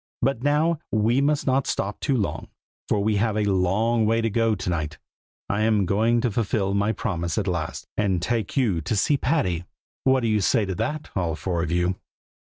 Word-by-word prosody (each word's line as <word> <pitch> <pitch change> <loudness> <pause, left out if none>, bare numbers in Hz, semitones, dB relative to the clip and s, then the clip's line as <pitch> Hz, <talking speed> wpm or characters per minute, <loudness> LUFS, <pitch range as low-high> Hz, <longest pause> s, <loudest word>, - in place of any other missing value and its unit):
But 130 -2 +1
now, 150 +3 +2
we 115 +4 +2
must 145 +1 +1
not 135 0 +1
stop 100 +1 -2
too 135 - 0
long, 105 - -2 0.4
for 100 -2 +1
we 105 0 +1
have 110 +1 +1
a 105 - +2
long 105 +4 +2
way 115 +1 +2
to 115 -1 0
go 115 0 +2
to 95 - -6
night. 75 -3 -3 0.5
I 100 +1 -1
am 110 -3 +3
going 115 +5 +2
to 120 - 0
fulfil 100 -2 0
my 100 +2 +2
promise 85 -6 -3
at 105 - 0
last, 85 -3 -3
and 95 -4 +1
take 110 - -2
you 105 -11 +2
to 95 - -2
see 125 +8 +2
Patty! 125 - 0 0.4
What 130 -1 +3
do 115 - 0
you 105 -1 +2
say 105 +2 +2
to 95 - -3
that, 150 - -3
all 85 -4 0
four 85 +2 -2
of 85 - -2
you?" 90 +2 0
105 Hz, 205 wpm, -24 LUFS, 95-120 Hz, 0.5 s, am